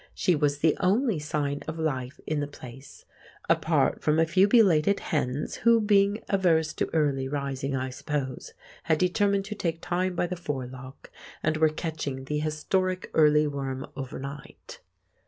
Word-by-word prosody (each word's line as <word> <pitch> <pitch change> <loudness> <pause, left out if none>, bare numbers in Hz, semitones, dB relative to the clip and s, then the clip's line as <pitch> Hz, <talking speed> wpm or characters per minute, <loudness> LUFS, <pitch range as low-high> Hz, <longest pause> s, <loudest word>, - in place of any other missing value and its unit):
She 180 - +2
was 145 -1 +1
the 155 +1 +2
only 205 - +2
sign 145 -1 -2
of 160 +1 -4
life 135 -5 -3
in 155 -1 -1
the 145 - -2
place 135 -1 -12 0.4
(apart - - +2
from 150 0 +2
a 165 - +4
few 185 +4 +4
belated 200 -5 +4
hens, 140 -2 -2
who, 235 0 +4
being 205 0 +2
averse 165 -5 +2
to - - -2
early 140 -4 +1
rising, 140 -1 -3
I 130 0 -2
suppose, 135 -1 -4 0.3
had 160 -2 +2
determined 195 +3 +1
to 210 - -5
take 165 -5 -2
time 180 +1 -1
by 175 - +1
the 180 +1 -4
forelock, 130 -5 -7 0.3
and 155 0 +1
were 155 0 +4
catching 150 -4 -4
the 150 +2 -2
historic 185 +5 -1
early 150 -1 +5
worm 135 -2 -4
overnight). 135 +1 -8
155 Hz, 155 wpm, -27 LUFS, 140-180 Hz, 0.4 s, early